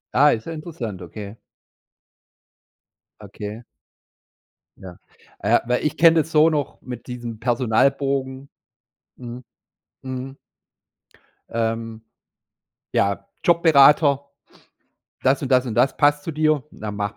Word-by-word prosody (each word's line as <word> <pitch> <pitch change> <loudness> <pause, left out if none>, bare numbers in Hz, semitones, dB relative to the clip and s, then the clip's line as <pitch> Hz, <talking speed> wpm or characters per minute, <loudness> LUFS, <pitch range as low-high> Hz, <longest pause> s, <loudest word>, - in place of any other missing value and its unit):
Ah, 145 +3 +6
ist 110 - -2
ja 165 - -5
interessant, 135 - -7
okay. 100 +5 -9 1.8
Okay. 105 +3 -8 1.1
Ja. 90 -2 -11 0.4
Äh, - - +3
weil 125 +3 -1
ich 150 - -1
kenne 165 +1 +6
das 160 +2 -9
so 155 +1 +5
noch 150 -4 -3
mit 125 -2 -9
diesem 120 -3 -7
Personalbogen 130 +3 0 0.7
Mhm. 125 0 -9 0.6
Mhm. 130 +1 -6 1.1
Ähm. 115 -1 -3 0.9
Ja, 100 - 0 0.2
Jobberater. 150 -4 +5 1.0
„Das 135 +2 +2
und 135 - -2
das 130 -1 +4
und 115 - -4
das 125 +4 +2
passt 145 0 +2
zu 165 - -4
dir. 155 -2 +1
Na, 105 -1 -7
mach 100 0 -4
130 Hz, 110 wpm, -22 LUFS, 115-145 Hz, 1.8 s, Ah